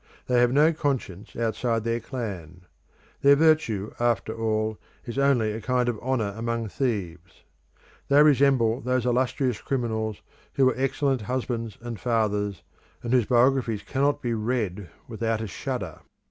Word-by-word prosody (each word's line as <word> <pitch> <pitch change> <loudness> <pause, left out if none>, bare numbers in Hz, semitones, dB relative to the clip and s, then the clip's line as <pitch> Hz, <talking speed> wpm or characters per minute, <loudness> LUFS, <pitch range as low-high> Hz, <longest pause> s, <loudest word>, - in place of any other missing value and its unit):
They 125 -1 +2
have 120 0 +4
no 150 +5 +4
conscience 130 - -3
outside 115 0 -1
their 115 0 0
clan. 95 - -6 0.6
Their 140 0 +7
virtue 150 -10 +2
after 120 -2 0
all 110 -1 -1 0.3
is 120 +2 -4
only 130 -6 +3
a 110 +2 -5
kind 125 +1 +1
of 120 -3 -1
honour 115 -5 -1
among 115 -1 -2
thieves. 95 -9 -4 0.6
They 145 +1 +6
resemble 135 -5 +3
those 125 0 0
illustrious 125 -1 0
criminals 110 -5 -2 0.3
who 135 - +3
were 130 - +4
excellent 135 0 0
husbands 115 -2 -3
and 120 -2 -6
fathers, 105 -5 -1 0.4
and 120 +1 -2
whose 125 -4 +4
biographies 120 -3 +2
cannot 140 +1 0
be 120 -1 0
read 105 -5 -2 0.2
without 115 -1 -2
a 110 - -3
shudder. 95 - -5
120 Hz, 145 wpm, -26 LUFS, 110-130 Hz, 0.6 s, Their